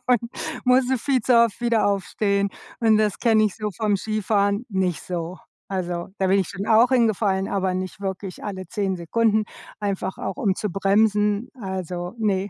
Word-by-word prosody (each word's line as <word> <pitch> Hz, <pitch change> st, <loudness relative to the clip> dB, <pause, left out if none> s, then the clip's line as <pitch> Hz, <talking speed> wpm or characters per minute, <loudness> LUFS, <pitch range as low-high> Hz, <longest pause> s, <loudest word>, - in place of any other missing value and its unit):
und 250 Hz, -3 st, +4 dB, 0.4 s
musste 255 Hz, +1 st, +3 dB
viel 265 Hz, +1 st, +1 dB
zu 240 Hz, +2 st, +3 dB
oft 235 Hz, 0 st, +3 dB
wieder 235 Hz, -3 st, +2 dB
aufstehen 200 Hz, 0 st, 0 dB, 0.3 s
und 220 Hz, -2 st, +5 dB
das 210 Hz, -2 st, +1 dB
kenne 220 Hz, -2 st, +4 dB
ich 210 Hz, -, 0 dB
so 215 Hz, -1 st, -2 dB
vom 210 Hz, -2 st, +1 dB
Skifahren 205 Hz, 0 st, 0 dB
nicht 190 Hz, -4 st, -1 dB
so. 175 Hz, 0 st, -5 dB, 0.3 s
Also, 175 Hz, -3 st, -3 dB
da 190 Hz, -, +1 dB
bin 195 Hz, +1 st, +4 dB
ich 190 Hz, -, 0 dB
schon 200 Hz, +1 st, -5 dB
auch 225 Hz, +2 st, +5 dB
hingefallen, 215 Hz, -6 st, +2 dB
aber 190 Hz, -2 st, 0 dB
nicht 185 Hz, +1 st, -4 dB
wirklich 190 Hz, -1 st, -5 dB
alle 190 Hz, -3 st, -5 dB
10 200 Hz, -4 st, -1 dB
Sekunden, 215 Hz, +5 st, +1 dB, 0.4 s
einfach 195 Hz, -2 st, -2 dB
auch -, -, -4 dB
um 205 Hz, -9 st, +1 dB
zu 210 Hz, -, -3 dB
bremsen, 205 Hz, +3 st, +2 dB
also, 180 Hz, -1 st, -4 dB
ne. 200 Hz, -2 st, 0 dB
200 Hz, 175 wpm, -23 LUFS, 190-220 Hz, 0.4 s, und